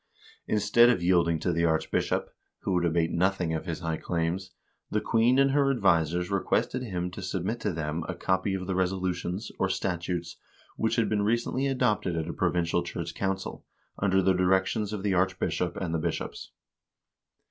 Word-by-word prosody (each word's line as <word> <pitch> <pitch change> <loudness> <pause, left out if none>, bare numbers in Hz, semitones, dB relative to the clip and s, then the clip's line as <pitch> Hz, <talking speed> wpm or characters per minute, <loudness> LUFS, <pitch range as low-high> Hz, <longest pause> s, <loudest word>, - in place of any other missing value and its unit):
Instead 110 +3 +5
of 105 -8 +1
yielding 85 -2 +3
to 85 +3 -1
the 85 0 +1
archbishop, 80 -1 0 0.3
who - - -1
would 90 -1 +2
abate 85 0 +1
nothing 90 -2 +1
of 80 - -3
his 85 0 -3
high 80 -1 -2
claims, 85 +3 -2 0.4
the - - +1
queen 115 +3 +3
and 135 0 +4
her 140 0 +3
advisers 90 - +2
requested 100 +5 0
him 90 -7 -3
to 95 - -8
submit 95 +4 -2
to 105 -3 -1
them 80 0 -3
a - - -2
copy 95 +1 0
of 95 -1 -4
the 95 - -2
resolutions, 95 +1 -1
or 95 - +1
statutes, 85 -2 -2 0.4
which - - 0
had - - +2
been 105 -1 +1
recently 120 +5 0
adopted 125 -9 +1
at 80 -1 -2
a - - -4
provincial 90 -1 +1
church 85 -1 -5
council, 95 -1 -3 0.4
under 95 -1 +2
the 95 +1 +4
directions 95 +3 +1
of 105 -2 -4
the 100 -2 +1
archbishop 90 -1 0
and 90 -4 -3
the 80 - 0
bishops. - - -4
95 Hz, 175 wpm, -28 LUFS, 85-100 Hz, 0.4 s, Instead